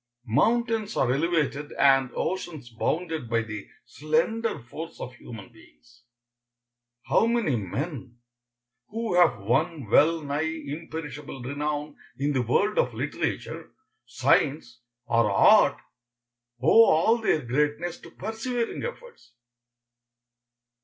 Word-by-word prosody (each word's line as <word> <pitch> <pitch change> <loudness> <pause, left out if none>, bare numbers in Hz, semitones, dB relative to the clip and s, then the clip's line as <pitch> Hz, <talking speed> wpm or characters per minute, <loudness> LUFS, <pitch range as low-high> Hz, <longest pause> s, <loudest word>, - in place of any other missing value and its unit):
Mountains 225 - +1
are 125 -2 +2
elevated 150 -1 -1
and 135 -1 +4
oceans 160 -9 -4
bounded 160 +2 -2
by 115 0 +1
the 110 -2 -7 0.2
slender 165 +10 -1
force 155 +8 -9
of 125 - -6
human 120 -2 -11
beings. 120 +2 -21 1.0
How 225 - +2
many 230 - +1
men, 120 - -5 0.7
who 225 -1 -3
have 175 -8 +4
won 135 - 0
well 165 +1 +4
nigh 145 +1 -2 0.2
imperishable 150 -3 -7
renown 145 +2 -3 0.2
in 145 +1 0
the 130 - +1
world 160 - +1
of - - +1
literature, - - -4 0.3
science, 125 -5 +1 0.2
or 115 -5 +2
art, - - +5 0.8
owe 190 - +6
all 220 +8 +4
their 160 -9 +1
greatness 150 +7 -1
to - - -13
persevering 230 +3 -4
efforts? 485 - -9
150 Hz, 110 wpm, -26 LUFS, 125-180 Hz, 1.0 s, owe